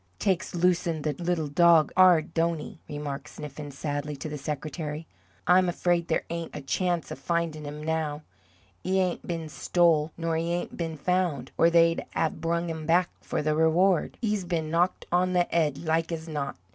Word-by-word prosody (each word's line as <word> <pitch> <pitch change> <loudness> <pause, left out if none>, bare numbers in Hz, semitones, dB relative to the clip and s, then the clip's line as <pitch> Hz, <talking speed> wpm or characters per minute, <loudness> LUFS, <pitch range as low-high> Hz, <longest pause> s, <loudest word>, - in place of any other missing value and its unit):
"Takes 185 -2 0
losin' 170 -3 +1
the 150 - 0
little 175 -2 0
dog 165 0 +5
'ard, 180 -4 +5
don't 165 0 +1
he?" 160 +4 -9
remarked 145 -1 -5
Sniffen, 150 0 -8
sadly, 145 +1 -4
to 140 +3 -6
the 150 - -5
secretary. 150 +2 -4 0.4
"I'm 180 +1 +5
afraid 175 -1 +1
there - - 0
ain't 170 -1 -5
a 150 - -5
chance 175 +3 -1
of - - -6
findin' 165 -1 -2
'im 150 +1 -7
now. 155 -1 -2 0.6
'E 190 +1 +1
ain't 180 -2 -1
been 165 -2 -3
stole, 160 -1 +2
nor 165 -1 -1
'e 165 - 0
ain't 175 0 -3
been 165 -2 -4
found, 170 -5 0
or 165 - +5
they'd 165 0 +4
'ave 160 - 0
brung 170 +1 -1
him 160 -2 -5
back 175 +2 +3
for - - -2
the 155 0 +1
reward. 165 +3 +3
'E's 210 -3 0
been 165 -3 -2
knocked 175 +2 +1
on 180 +1 +2
the 175 -1 +3
'ead, 150 -4 +2
like 160 +1 +1
as 165 0 -4
not. 145 -3 -3
165 Hz, 185 wpm, -27 LUFS, 150-175 Hz, 0.6 s, dog